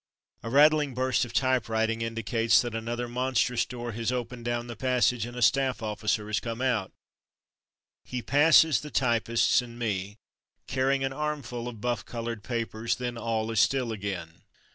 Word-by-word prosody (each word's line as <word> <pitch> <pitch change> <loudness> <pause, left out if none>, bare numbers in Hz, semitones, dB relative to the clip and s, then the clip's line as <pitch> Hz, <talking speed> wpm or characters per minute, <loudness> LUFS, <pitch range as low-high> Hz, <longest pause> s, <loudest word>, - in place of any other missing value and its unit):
A 115 - -5
rattling 150 0 +4
burst 130 -1 +1
of 120 - -10
typewriting 115 -3 +1
indicates 115 +1 +2
that 120 -2 -4
another 120 +2 -3
monstrous 125 0 0
door 120 -1 -5
has 115 +2 -2
opened 125 -1 -4
down 120 0 -1
the 120 -1 -7
passage, 125 -1 +1
and 120 0 -9
a 125 - 0
staff 130 +1 +2
officer 105 0 -1
has 105 0 -1
come 115 0 -5
out. 125 -7 0 1.1
He 125 -2 -5
passes 155 +4 +5
the 150 - -8
typists 115 -3 +2
and 120 -1 -10
me, 105 -3 -3 0.5
carrying 135 +1 +1
an 135 0 -1
armful 135 -5 -4
of 115 -4 -8
buff 120 0 -1
coloured 115 -2 -5
papers, 115 -2 -2
then 125 -2 -4
all 115 -1 -2
is 110 - +1
still 125 0 +2
again. 95 -6 -5
120 Hz, 165 wpm, -28 LUFS, 115-130 Hz, 1.1 s, passes